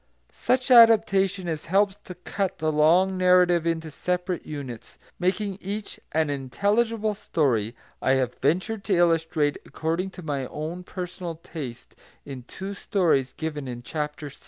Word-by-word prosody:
Such 255 +1 0
adaptation 200 -5 +6
as 160 -3 -3
helps 195 +2 +2
to 180 - -8
cut 190 +2 -3
the 155 -3 0
long 175 +5 +3
narrative 180 -2 +4
into 165 -1 -2
separate 180 +3 -2
units, 135 -6 -7 0.2
making 195 +2 -1
each 205 +2 -5
an 155 -2 +1
intelligible 210 - 0
story, 125 - 0 0.3
I 130 - +3
have 130 -2 0
ventured 190 - 0
to 195 - +2
illustrate 165 -3 +2
according 165 +4 -2
to 180 - -8
my 140 -4 -2
own 160 +4 -5
personal 180 -2 -6
taste, 145 -7 -8 0.3
in 135 -3 -7
two 195 +1 -6
stories 170 - +1
given 150 -3 -4
in 120 -1 -6
Chapter 150 +1 -4
VI. 140 - -15
170 Hz, 145 wpm, -25 LUFS, 150-195 Hz, 0.3 s, adaptation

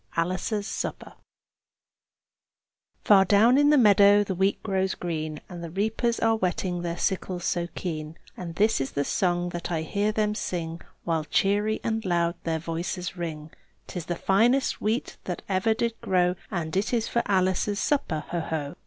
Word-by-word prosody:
ALICE'S 185 +5 -1
SUPPER - - -5 1.9
Far 200 -2 +6
down 220 +7 +5
in 290 0 +5
the 300 - +6
meadow 205 -3 +6
the 195 - -3
wheat 190 +2 0
grows 190 -2 0
green, 155 -3 -4
And 175 -2 -8
the 170 - -5
reapers 220 +6 0
are 225 0 +3
whetting 180 -2 -1
their 170 0 -3
sickles 185 -2 -2
so 175 -1 0
keen; 155 -3 -5 0.2
And 170 -2 -7
this 215 -5 +2
is 135 - -3
the 140 0 0
song 175 -1 0
that 175 0 -5
I 160 -2 -1
hear 205 +6 0
them 210 -1 0
sing, 170 -5 -4 0.2
While 160 -2 -1
cheery 205 +5 +1
and 225 -1 -1
loud 170 -2 +1
their 165 -1 0
voices 170 +3 -4
ring: 160 -3 -5 0.3
"'Tis 175 -4 -6
the 175 - -1
finest 235 +10 +2
wheat 220 +4 -1
that 180 -2 -4
ever 200 +3 +1
did 235 0 0
grow! 180 -1 +2 0.2
And 170 -5 -3
it 195 +2 0
is 230 -2 +1
for 235 - +1
Alice's 190 +1 +1
supper, 175 - 0
ho! 175 - -1
ho!" 155 -3 -3
185 Hz, 170 wpm, -26 LUFS, 170-210 Hz, 1.9 s, Far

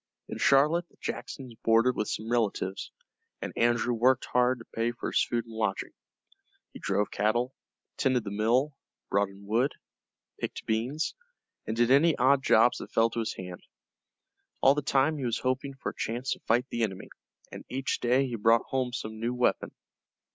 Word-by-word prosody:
In - - -6
Charlotte 155 +5 +3
the - - -28
Jacksons 130 -4 -6
boarded 115 +2 +4
with 105 - -2
some 110 +2 -4
relatives, 105 -5 -1 0.5
and - - -5
Andrew 120 +1 +2
worked 125 +2 +3
hard 125 0 +2
to 115 - -12
pay 115 +1 -2
for 120 - -5
his - - +3
food 120 -1 -2
and 115 - -12
lodging. 110 -3 -2 0.8
He - - -9
drove 105 0 0
cattle, 120 +5 0 0.4
tended 130 -3 +1
the 100 - -5
mill, 120 +8 +1 0.4
brought 100 0 +2
in 100 +1 -14
wood, 120 +7 +1 0.7
picked - - -5
beans, 125 +8 -1 0.5
and 110 - -3
did 120 +1 +3
any 150 +3 +5
odd 135 +2 +4
jobs 120 -1 +4
that - - -9
fell 115 0 +3
to 115 - -3
his 115 - -2
hand. 90 -1 -8 1.0
All 135 - +6
the 150 - -1
time 140 +2 +1
he 135 - -3
was 115 -1 0
hoping 130 +2 -2
for 135 - -4
a - - -24
chance 120 +4 -3
to - - -2
fight 120 +2 +3
the 120 - -2
enemy, 95 -4 -3 0.4
and - - -8
each 135 +1 -2
day 125 +3 +2
he 125 -3 -4
brought 115 +1 +3
home 130 -2 -1
some 110 -3 -5
new 120 +2 -2
weapon. 125 0 +1
120 Hz, 185 wpm, -28 LUFS, 110-130 Hz, 1.0 s, All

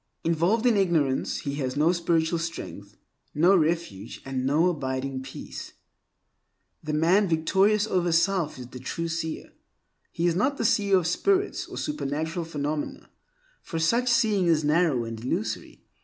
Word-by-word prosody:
Involved 170 +8 +1
in 235 -4 +4
ignorance, 160 -9 +1
he 140 - -3
has 130 -3 -2
no 155 +3 +4
spiritual 170 -1 +1
strength, 105 -11 -7 0.4
no 175 +6 +5
refuge, 155 - -1
and 130 -1 -2
no 155 +6 +3
abiding 135 -4 -2
peace. 130 0 -8 1.1
The 155 - -3
man 175 +7 +3
victorious 190 +6 +2
over 180 -5 0
self 170 -2 +1
is 125 - -7
the 125 - -9
true 165 +6 -4
seer. 165 -1 -4 0.6
He 170 - -2
is 170 -1 +2
not 270 +9 +1
the - - -1
seer 200 -3 +3
of 180 - 0
spirits 390 - +1
or - - -8
supernatural 160 - -3
phenomena, 150 -1 -4 0.5
for 165 - -6
such 235 +10 +2
seeing 215 -7 +3
is 160 -2 +3
narrow 150 -5 +2
and 115 0 -7
illusory. 110 -3 -3
165 Hz, 150 wpm, -26 LUFS, 145-185 Hz, 1.1 s, no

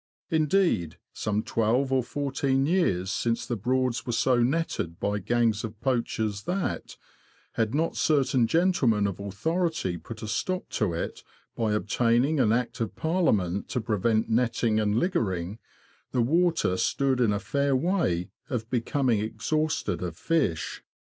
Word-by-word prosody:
Indeed, 155 - +2 0.2
some 105 0 -1
twelve 125 +5 +1
or 130 - +3
fourteen 135 0 0
years 100 - +1
since 115 +3 -1
the 120 - -2
Broads^ 125 +2 0
were 120 - -3
so 120 +1 +2
netted 125 - -1
by 105 0 -1
gangs 115 +1 +1
of 110 -2 -6
poachers 110 -5 -1
that, 180 +3 -3 0.5
had 115 +3 -1
not 165 +2 0
certain 135 -5 +2
gentlemen 135 - +2
of 100 -2 -2
authority 100 - -1
put 110 +4 -9
a - - -4
stop 185 - -2
to 105 -6 0
it 85 - -4 0.3
by 110 -2 0
obtaining 120 +7 +2
an 110 -5 +4
Act 125 +1 -1
of 115 - -2
Parliament 110 - 0
to 125 - -1
prevent 110 0 +1
netting 115 -1 +1
and 105 -1 +1
liggering, 105 - -1 0.5
the 125 - +2
water 165 - +2
stood 135 +4 +1
in 115 -4 +3
a 100 - 0
fair 140 +6 0
way 130 - 0 0.2
of 115 -3 -3
becoming 125 -1 +1
exhausted 155 +8 -1
of 90 -2 -4
fish. 140 - -1
120 Hz, 145 wpm, -27 LUFS, 105-140 Hz, 0.5 s, an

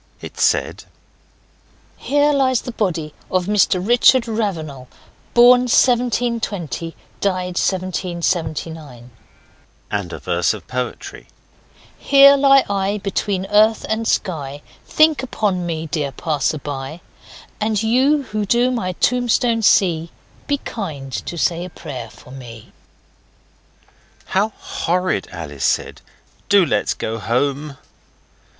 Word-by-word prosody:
It - - -10
said - - +1 1.1
'Here 290 +1 +1
lies 260 -3 +2
the 245 - -6
body 170 -9 -2 0.2
of 185 -1 0
Mr 195 -2 +2
Richard 245 +1 +5
Ravenal 170 - -4 0.5
Born 245 +1 +6
1720. 230 - 0 0.2
Died 185 -2 -1
1779.' 170 -8 -3 0.8
and - - -3
a - - -6
verse 85 -1 0
of - - -12
poetry: 130 - -5 0.7
'Here 280 0 +7
lie 275 -1 +5
I, 200 0 -1
between 195 -1 -2
earth 215 +1 +4
and 220 +1 -1
sky, 145 -9 -2 0.2
Think 310 -4 +3
upon 200 -8 -1
me, 160 -1 -3
dear 150 -3 -2
passers 150 +1 -2
by, 145 +3 -6 0.6
And 215 0 0
you 265 +6 +2
who 215 -4 -3
do 240 +5 +2
my 185 -7 -2
tombstone 245 +2 +1
see 170 -6 +3 0.4
Be 285 - +1
kind 155 - -6
to 170 - -5
say 170 +2 0
a 180 - -7
prayer 125 -8 -8
for 125 - -16
me.' 120 -4 -11 1.5
'How 200 +3 +1
horrid!' 180 -3 -2
Alice 75 -6 -7
said. - - -1 0.5
'Do 200 -3 +5
let's 105 -9 0
get 115 +1 -4
home. 135 +6 -1
185 Hz, 115 wpm, -19 LUFS, 150-230 Hz, 1.5 s, Here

